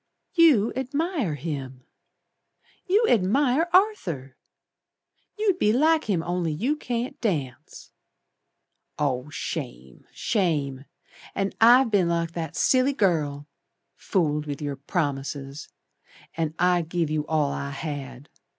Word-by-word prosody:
"You 300 - +5
admire 275 - -1
him! 135 -4 -6 1.0
You 415 +5 +4
admire 260 - +2
Arthur! 180 - +1 1.0
You'd 405 -4 +1
be 210 - +3
like 315 +6 +3
him 185 -6 0
only 175 -1 -1
you 235 - 0
can't 245 -4 -4
dance. 145 - -4 1.1
Oh, 135 -1 -1
Shame! 65 - -6
Shame! 150 - -1 0.5
And 195 0 -1
I've 240 +1 +6
been 190 -5 +3
like 170 -1 -1
that 165 -2 -5
silly 260 - +3
girl. 150 - 0 0.5
Fooled 150 -5 -1
with 145 -1 -4
your 145 -2 -4
promises, 140 -2 -3 0.7
And 160 -1 -2
I 180 0 +3
give 165 -1 -2
you 150 -1 -1
all 150 -3 +1
I 140 - -4
had. 140 -2 -6
170 Hz, 115 wpm, -25 LUFS, -, 1.1 s, I've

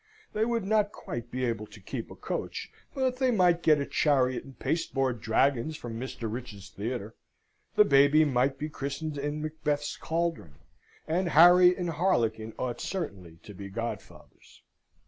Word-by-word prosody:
They 215 +1 +1
would 230 -3 -1
not 210 0 +2
quite 120 - -7
be 130 +1 -2
able 110 -3 -2
to 105 - -14
keep 95 - -6
a - - -10
coach, - - -5 0.2
but 260 -2 0
they 260 -1 +2
might 180 -7 +3
get 155 -3 +4
a 140 - -1
chariot 130 -5 +1
and 135 -1 -14
pasteboard 135 -7 -1
dragons 135 +6 +1
from 115 -2 -6
Mr. 130 -1 -7
Rich's 105 -4 -7
theatre. 115 0 -4 0.6
The 210 - +7
baby 145 0 +5
might 135 0 +1
be 150 - -3
christened 145 +1 -4
in 145 +2 -3
Macbeth's 150 -1 -2
caldron; 165 - -2 0.5
and 175 +3 0
Harry 180 +3 +7
and 175 -2 -2
harlequin 115 - 0
ought 125 -2 -3
certainly 95 - -5
to 105 - -10
be 100 +1 -8
godfathers. 115 +4 -8
140 Hz, 160 wpm, -28 LUFS, 120-170 Hz, 0.6 s, The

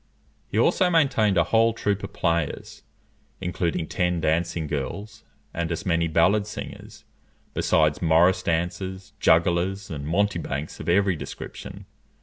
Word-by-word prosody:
He - - -4
also 185 -2 +3
maintained 135 - +3
a 85 - +5
whole 115 +4 +3
troop 105 -3 -1
of 100 - -5
players, 85 -3 -2 0.6
including 90 -2 -2
ten 90 0 0
dancing 85 +1 0
girls 100 +10 -5 0.3
and 85 0 -2
as 85 - -3
many 85 -2 +1
ballad 95 +6 +3
singers, 105 - -9 0.5
besides 75 -1 +2
morris 85 +3 +4
dancers, 95 +3 -3
jugglers, 85 +4 +2
and 70 -2 -5
mountebanks 85 -5 -1
of - - -4
every 95 +1 +3
description. - - -8
90 Hz, 130 wpm, -25 LUFS, 85-100 Hz, 0.6 s, a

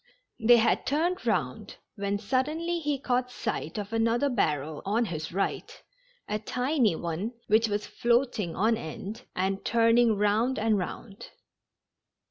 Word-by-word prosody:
The}^ 235 +2 +6
had 230 - +2
turned 345 +6 0
round, - - -1 0.2
when 200 -1 -2
suddenly 300 +10 -1
he 295 -3 -1
caught 250 -1 0
sight 165 -8 -4
of 205 +1 -5
another 230 +4 +2
barrel 155 - -1
on 220 +4 +1
his 160 -5 -5
right 195 +3 -3 0.3
— - - -36
a 210 - -2
tiny 250 - +1
one, 170 +8 -3
which 220 +2 +3
was 205 0 -2
floating 235 -7 0
on 225 +3 +2
end, 205 +4 -7
and 190 +1 -1
turning 230 -1 +4
round 210 +5 +1
and 220 0 +2
round. 195 +3 -7
225 Hz, 140 wpm, -28 LUFS, 200-250 Hz, 0.3 s, The}^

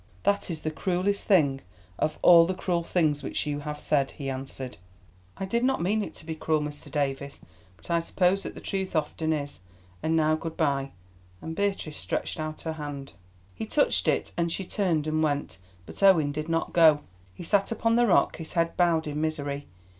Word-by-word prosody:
"That 200 -1 +1
is 160 -3 -4
the 155 - -2
cruellest 185 +4 -1
thing 145 -9 +4 0.4
of 155 0 0
all 170 -1 +8
the 185 - -1
cruel 175 -2 0
things 155 -4 +1
which 140 - -3
you 145 -1 -2
have 150 0 -5
said," 140 -3 +1
he 135 -2 -5
answered. 130 -3 -6 0.6
"I 195 - -3
did 235 +5 0
not 265 +1 +2
mean 205 +5 +1
it - - -8
to - - -10
be 160 - -3
cruel, 155 0 0
Mr. 150 -1 -6
Davies, 140 -1 -2 0.4
but - - -10
I 170 - +3
suppose 180 +3 +1
that - - -7
the - - -9
truth 190 -2 -3
often 160 +1 0
is. 145 -2 -3 0.4
And 160 +1 +1
now 155 -1 +3
good 160 +1 -4
bye," 140 -4 0 0.5
and 160 - -6
Beatrice 195 -6 -2
stretched - - -3
out 155 0 -4
her 160 - -3
hand. 145 -3 -7 0.4
He 90 - -5
touched - - +2
it, - - +1
and 170 -1 0
she 190 - -3
turned 175 -6 0
and 155 0 0
went. 145 -9 -1 0.3
But - - -10
Owen 170 -7 +5
did 155 +2 -4
not 165 0 -1
go. 160 -3 +6 0.3
He - - -8
sat 195 +4 +1
upon 230 0 +1
the 240 0 +4
rock, 190 - +3
his 165 -1 -8
head 165 -1 +1
bowed 170 -2 +3
in 150 0 -3
misery. 145 -3 -2
160 Hz, 200 wpm, -27 LUFS, 145-180 Hz, 0.6 s, all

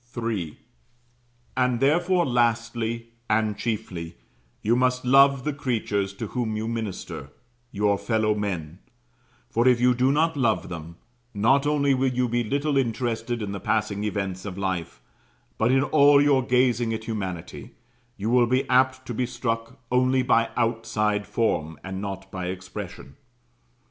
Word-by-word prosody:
III. 105 -10 -3 1.0
And 125 -2 +1
therefore, 175 +6 +3
lastly, 115 -1 0 0.2
and 110 -1 +1
chiefly, 90 - -4 0.5
you 115 +3 +3
must 125 0 +1
love 135 0 +5
the 150 - -1
creatures 110 -8 -1
to 105 +3 -5
whom 115 -4 -2
you 110 +1 -3
minister, 110 -10 -5 0.4
your 100 -1 +1
fellow 110 -2 +1
men; 90 -6 -4 0.7
for, 120 +2 +2
if 125 -2 +5
you 125 +1 +4
do 125 +2 +2
not 160 +3 +2
love 120 -6 +1
them, 85 -1 -7 0.4
not 135 +8 +3
only 140 -2 +2
will 130 0 +2
you 125 0 0
be 120 +1 0
little 140 +5 0
interested 120 -2 -1
in 100 - -4
the 100 - -4
passing 105 -1 -1
events 95 -3 -3
of 95 -3 -6
life, 90 -10 -3 0.6
but 115 - +3
in 135 +1 +4
all 145 -1 +5
your 140 -2 +4
gazing 125 -2 +2
at 110 - -6
humanity, 95 -7 -6 0.4
you 105 +3 -2
will 120 -1 +4
be 130 +2 +1
apt 130 0 +3
to 120 - -5
be 125 +2 -1
struck 115 -2 -3
only 130 +1 +3
by 115 -2 +3
outside 110 -3 0
form, 80 -8 -1
and 95 0 -5
not 95 -1 -6
by 90 -1 -4
expression. 90 -6 -7
115 Hz, 150 wpm, -25 LUFS, 105-130 Hz, 1.0 s, love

